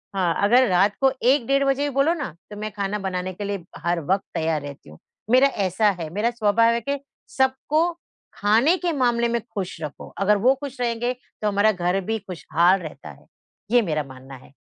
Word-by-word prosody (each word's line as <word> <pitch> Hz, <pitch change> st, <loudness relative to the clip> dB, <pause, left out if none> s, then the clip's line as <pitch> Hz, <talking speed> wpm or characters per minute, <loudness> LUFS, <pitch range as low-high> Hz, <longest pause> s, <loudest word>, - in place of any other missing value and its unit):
हाँ, 175 Hz, -3 st, +1 dB
अगर 245 Hz, +5 st, +5 dB
रात 195 Hz, +3 st, +3 dB
को 270 Hz, -1 st, +5 dB
1 255 Hz, -1 st, +3 dB
डेढ़ 275 Hz, 0 st, +3 dB
बजे 275 Hz, +1 st, +1 dB
भी 290 Hz, -, 0 dB
बोलो 290 Hz, +5 st, +3 dB
ना, 280 Hz, -, -5 dB, 0.2 s
तो 210 Hz, -, -9 dB
मैं 215 Hz, 0 st, -4 dB
खाना 205 Hz, 0 st, -3 dB
बनाने 185 Hz, -1 st, -3 dB
के 205 Hz, -, -7 dB
लिए 200 Hz, -3 st, -4 dB, 0.2 s
हर 175 Hz, 0 st, +1 dB
वक़्त 195 Hz, 0 st, +2 dB
तैयार 160 Hz, -2 st, 0 dB
रहती 140 Hz, -, -10 dB
हूँ। 75 Hz, -, -14 dB, 0.3 s
मेरा 260 Hz, +2 st, +6 dB
ऐसा 205 Hz, -3 st, +1 dB
है, 160 Hz, -2 st, -4 dB
मेरा 215 Hz, +4 st, +1 dB
स्वभाव 230 Hz, 0 st, +3 dB
है 235 Hz, -, -1 dB
कि 280 Hz, +3 st, -2 dB, 0.4 s
सबको 290 Hz, +6 st, +1 dB, 0.4 s
खाने 230 Hz, -, +3 dB
के 350 Hz, -2 st, -1 dB
मामले 240 Hz, -3 st, +2 dB
में 235 Hz, -1 st, -1 dB
खुश 190 Hz, -4 st, -4 dB
रखो, 150 Hz, -2 st, -7 dB
अगर 205 Hz, +1 st, +3 dB
वो 255 Hz, +6 st, +4 dB
खुश 270 Hz, -2 st, -7 dB
रहेंगे, 240 Hz, +1 st, 0 dB
तो 230 Hz, -3 st, -7 dB
हमारा 205 Hz, +1 st, +3 dB
घर 180 Hz, 0 st, -1 dB
भी 225 Hz, 0 st, -1 dB
खुशहाल 180 Hz, 0 st, +1 dB
रहता 155 Hz, -, -9 dB
है, -, -, -15 dB, 0.5 s
ये 245 Hz, -1 st, +5 dB
मेरा 155 Hz, -6 st, -1 dB
मानना 130 Hz, 0 st, -12 dB
है। 130 Hz, -, -16 dB
210 Hz, 205 wpm, -23 LUFS, 180-250 Hz, 0.5 s, मेरा